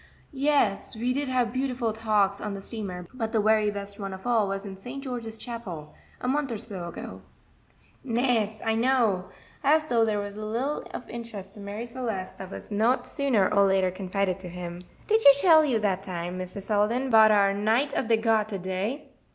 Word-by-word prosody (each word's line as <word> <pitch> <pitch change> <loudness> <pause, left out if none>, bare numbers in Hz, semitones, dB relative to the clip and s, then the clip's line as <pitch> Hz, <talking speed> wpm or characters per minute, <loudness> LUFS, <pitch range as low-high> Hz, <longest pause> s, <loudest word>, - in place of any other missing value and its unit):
"Yes, 275 -9 +1
we 245 +3 0
did 280 +1 -1
have 250 -3 0
beautiful 255 -4 -1
talks 210 -3 +1
on 210 -1 -3
the 195 - -7
steamer, 195 -6 -5
but 225 -3 -3
the 225 - +2
very 215 0 +3
best 200 0 -5
one 195 -1 -4
of 190 - -13
all 230 -4 +2
was 195 +1 -3
in 195 -1 -7
St. 245 +8 -8
George's 235 -4 -5
Chapel, 195 -11 -7 0.3
a - - -4
month 280 0 0
or 225 - -2
so 200 -5 -6
ago." 95 - -8 0.8
"Nes, 230 -4 0
I 225 - +2
know," 225 -6 +2 0.4
as 310 +2 +4
though 235 -6 +2
there 215 -2 +1
was 205 0 -5
little 230 +7 -2
of - - -7
interest 215 -5 -8
to 215 - -13
Marie 205 +3 -5
Celeste 230 -6 -5
that 190 - -7
was 195 - -9
not 240 +4 +2
sooner 255 -7 +1
or 200 -1 +5
later 190 -1 +2
confided 190 0 -2
to 185 -2 -8
him. 175 0 -7 0.2
"Did 440 +1 +3
she 280 - +9
tell 315 -1 +7
you 265 -6 +2
dat 195 -3 0
time, 180 -1 -5
Mr. 185 +2 -6
Selden, 220 +6 +1
'bout 220 -1 +8
our 200 -2 +4
Knight 225 +8 +1
of - - -1
de 225 0 +4
Garter 220 -2 +1
day?" 190 +9 -3
215 Hz, 195 wpm, -27 LUFS, 195-245 Hz, 0.8 s, she